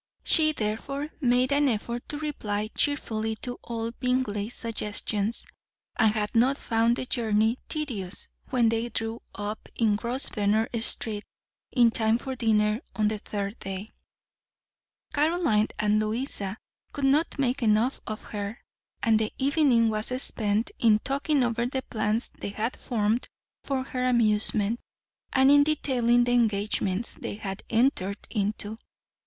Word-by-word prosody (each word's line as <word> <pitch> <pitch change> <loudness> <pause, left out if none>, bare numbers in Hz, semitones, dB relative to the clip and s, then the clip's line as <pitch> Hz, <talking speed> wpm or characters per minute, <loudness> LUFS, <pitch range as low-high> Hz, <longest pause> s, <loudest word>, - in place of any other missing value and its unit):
She, 310 -2 +5
therefore, 275 +5 -3
made 255 0 +3
an 285 0 +3
effort 235 +1 -3
to 295 - -3
reply 215 -9 -3
cheerfully 220 -7 0
to 245 -1 -4
all 230 -1 -4
Bingley's 245 -4 -1
suggestions, 215 -1 -1 0.5
and 220 -2 +4
had 210 -1 -2
not 255 +4 +4
found 230 -1 +2
the 255 - -4
journey 225 -1 +1
tedious 215 - -4 0.2
when 240 -3 +3
they 230 +1 -1
drew 225 +1 -3
up 205 +1 -5
in 220 -3 +2
Grosvenor 225 -3 +1
Street 215 -2 0 0.5
in 240 -3 +5
time 220 0 +2
for 265 +2 -5
dinner 215 -2 +2
on 215 -1 +2
the 215 -1 -3
third 200 +1 -4
day. 195 +2 -6 1.2
Caroline 295 -8 +2
and 210 0 +2
Louisa 215 -2 -2 0.4
could 285 -2 -1
not 295 +5 +2
make 265 -1 0
enough 225 +3 +2
of 215 -1 -5
her, 205 +1 -5 0.5
and 220 -1 +4
the 215 -1 -1
evening 270 -5 +3
was 215 0 -2
spent 215 -3 +2
in 220 -3 +5
talking 275 +4 0
over 235 0 0
the 260 +1 -3
plans 215 +1 -1
they - - -4
had 220 +4 -2
formed 225 0 -1 0.4
for 270 -2 -1
her 255 -1 -2
amusement, 215 -1 +2 0.5
and 265 +1 +5
in 285 0 +7
detailing 250 -5 +2
the 245 - 0
engagements 210 -2 +1
they - - -5
had 195 -2 -5
entered 220 -5 +1
into. 210 0 -2
230 Hz, 140 wpm, -27 LUFS, 210-255 Hz, 1.2 s, in